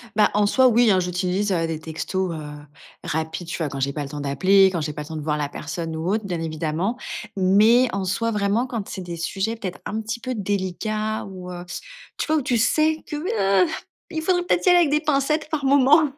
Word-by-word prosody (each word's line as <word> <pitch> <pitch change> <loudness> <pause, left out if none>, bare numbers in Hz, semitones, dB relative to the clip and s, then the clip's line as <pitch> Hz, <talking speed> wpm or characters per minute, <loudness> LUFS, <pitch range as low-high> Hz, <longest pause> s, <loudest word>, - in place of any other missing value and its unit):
Ben, 210 -1 +5
en 205 0 +3
soi, 260 +5 +4
oui, 235 -2 +5
hein, 185 - +4
j'utilise, 180 +3 -1
heu, 165 -2 0
des 160 -1 -3
textos, 165 +3 -3
heu, 160 - -6 0.6
rapides, 160 +2 -3
tu 165 - -4
vois, 160 -4 -2
quand 135 - -6
j'ai 140 +1 0
pas 145 - -3
le 140 - -7
temps 150 0 -6
d'appeler, 185 +8 +4
quand 170 -3 -2
j'ai 150 0 -2
pas 150 - -6
le - - -12
temps 160 - -7
de 155 - -4
voir 150 0 -1
la 145 -1 -1
personne 160 +2 -5
ou 160 +2 -3
autre, 215 +1 0
bien 175 -4 -3
évidemment. 160 +7 -2 0.4
Mais 215 +7 +5
en 195 0 -1
soi, 230 +5 0
vraiment, 210 +3 +1
quand 230 -5 -4
c'est 190 - -5
des 175 -1 -6
sujets 195 +6 -2
peut-être 190 -5 -6
un 220 +1 -3
petit 225 +2 -4
peu 255 +2 -4
délicats 210 +2 -2
ou, 185 -2 -8
heu, 175 0 -7 0.5
tu - - -2
vois, 315 - +2
où - - +1
tu 250 -2 0
sais 310 +7 +2
que, - - -4 0.5
heu, - - -3 0.4
il 320 -2 -3
faudrait 355 +1 +1
peut-être 350 - +1
y 365 - +6
aller 355 - +7
avec 335 -4 +3
des 300 +1 +3
pincettes 305 0 0
par 310 -3 -2
moment, 280 +3 +6
195 Hz, 235 wpm, -23 LUFS, 165-240 Hz, 0.6 s, aller